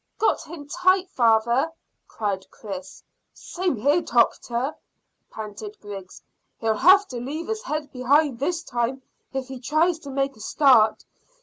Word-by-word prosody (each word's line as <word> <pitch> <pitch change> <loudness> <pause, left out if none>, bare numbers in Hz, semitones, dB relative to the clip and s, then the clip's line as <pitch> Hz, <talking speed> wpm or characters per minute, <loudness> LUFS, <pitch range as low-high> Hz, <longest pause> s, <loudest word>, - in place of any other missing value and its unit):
"Got 445 - +2
him 300 -3 -10
tight, 370 +4 +2
father," 235 +5 +3 0.4
cried 200 -3 -3
Chris. 190 -3 -9 0.3
"Same 360 -3 -2
here, 285 +10 +2
doctor," 240 +2 +1 0.6
panted 210 -1 -8
Griggs. 195 -3 -9 0.3
"He'll 225 -1 +1
have 380 - +6
to 250 - -5
leave 295 +7 -5
his 440 0 -2
head 305 - -4
behind 265 +1 +2
this 335 +4 -1
time 245 +2 -2 0.3
if 265 -1 -4
he 265 -1 -7
tries 315 +6 +1
to 285 - -10
make 275 0 -1
a - - -18
start. 225 -2 +4
265 Hz, 140 wpm, -24 LUFS, 225-315 Hz, 0.6 s, have